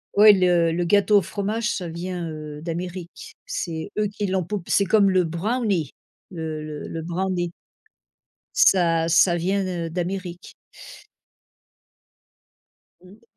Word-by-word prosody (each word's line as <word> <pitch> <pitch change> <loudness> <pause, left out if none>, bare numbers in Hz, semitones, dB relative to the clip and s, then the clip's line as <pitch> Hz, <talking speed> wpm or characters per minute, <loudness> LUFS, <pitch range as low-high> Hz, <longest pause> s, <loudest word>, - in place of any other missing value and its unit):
Oui, 210 +1 +9
le 175 -2 +3
le 175 +2 -1
gâteau 205 +3 +4
au - - +4
fromage 215 +5 -2
ça 180 - -4
vient, 175 0 -5
heu, 150 -1 -8
d'Amérique, 175 - -6
c'est 165 - -4
eux 210 - +2
qui 205 0 -3
l'ont 185 -1 0
poupe 195 0 -5
c'est 200 - +3
comme 200 +1 +4
le 185 -1 +3
brownie, 185 - -1 0.4
le 160 -3 -5
le 150 -1 -7
le 165 - -5
brownie. 175 +1 -2 1.0
Ça 165 -3 +4
ça 170 +2 +5
vient 190 +4 0
de 175 -3 -3
d'Amérique. 180 +1 -5 2.5
Mmh. 195 +5 -18
180 Hz, 130 wpm, -23 LUFS, 165-200 Hz, 2.5 s, Oui